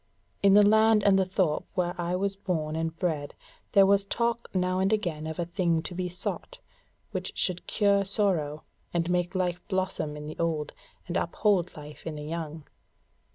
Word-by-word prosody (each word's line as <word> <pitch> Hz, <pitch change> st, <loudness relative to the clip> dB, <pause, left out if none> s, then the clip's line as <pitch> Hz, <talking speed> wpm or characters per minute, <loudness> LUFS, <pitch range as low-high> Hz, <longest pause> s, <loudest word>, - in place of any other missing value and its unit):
In 200 Hz, 0 st, +6 dB
the 205 Hz, 0 st, +7 dB
land 220 Hz, 0 st, +5 dB
and 195 Hz, -1 st, +5 dB
the 190 Hz, -, +1 dB
thorp 185 Hz, -5 st, 0 dB
where 175 Hz, -2 st, 0 dB
I 175 Hz, 0 st, -1 dB
was 195 Hz, +1 st, -1 dB
born 160 Hz, -6 st, -2 dB
and 165 Hz, 0 st, -2 dB
bred 155 Hz, -5 st, -2 dB, 0.4 s
there 195 Hz, -1 st, +7 dB
was 200 Hz, 0 st, +4 dB
talk 235 Hz, +3 st, -1 dB
now 185 Hz, 0 st, 0 dB
and 190 Hz, +2 st, +2 dB
again 170 Hz, -8 st, -1 dB
of 160 Hz, -, -5 dB
a 175 Hz, -, -1 dB
thing 170 Hz, -2 st, 0 dB
to 180 Hz, -, -6 dB
be 180 Hz, 0 st, -2 dB
sought, 180 Hz, -, -5 dB, 0.5 s
which -, -, -4 dB
should 180 Hz, -1 st, -1 dB
cure 200 Hz, -2 st, +3 dB
sorrow, 185 Hz, -7 st, 0 dB, 0.3 s
and 170 Hz, +1 st, +1 dB
make 180 Hz, +1 st, 0 dB
life 180 Hz, -1 st, 0 dB
blossom 185 Hz, -5 st, -2 dB
in 150 Hz, -, -7 dB
the 155 Hz, -, -8 dB
old, 160 Hz, -3 st, -1 dB, 0.3 s
and 175 Hz, -, -1 dB
uphold 180 Hz, -1 st, +1 dB
life 150 Hz, +1 st, -10 dB
in 160 Hz, -, -4 dB
the 150 Hz, 0 st, -6 dB
young." 160 Hz, -1 st, -5 dB
180 Hz, 185 wpm, -28 LUFS, 160-195 Hz, 0.5 s, the